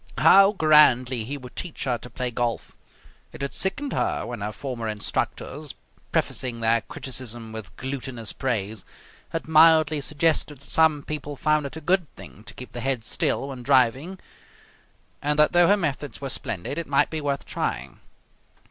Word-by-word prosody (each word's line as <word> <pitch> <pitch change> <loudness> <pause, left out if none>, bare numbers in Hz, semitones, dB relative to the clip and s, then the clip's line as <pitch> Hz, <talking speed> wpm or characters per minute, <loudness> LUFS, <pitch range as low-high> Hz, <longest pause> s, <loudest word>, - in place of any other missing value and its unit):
How 195 +1 +7
grandly 130 - +4
he 140 +5 -4
would 125 -2 -12
teach 175 -4 -5
her 125 -3 -1
to 125 - -9
play 125 +1 -3
golf. 120 0 -3 0.6
It - - -7
had 140 - -3
sickened 220 +9 -1
her - - -1
when 120 -3 -6
her 105 +1 -3
former 120 0 -5
instructors, 130 +7 -3 0.4
prefacing 125 -3 -1
their 115 0 +2
criticism 120 -1 -5
with 110 -2 -8
glutinous 130 -4 -4
praise, 110 -5 -2 0.5
had 165 - -4
mildly 160 -1 +5
suggested 150 0 +1
that - - -13
some 155 -3 +3
people 145 -1 -5
found 155 0 +1
it 140 - -8
a - - -7
good 180 0 +1
thing 105 - -12
to - - -9
keep 125 - -9
the 120 - -6
head 130 -3 -1
still 135 +3 -1
when 130 -2 -7
driving 135 +7 +2 1.0
and 150 +1 0
that 150 0 +5
though 175 -1 +5
her 205 - +5
methods 145 -5 -3
were 135 - -5
splendid 115 - -3
it 170 - -5
might 140 -1 +2
be 160 -1 -3
worth 140 -1 -2
trying. - - -4
140 Hz, 170 wpm, -25 LUFS, 120-155 Hz, 1.0 s, How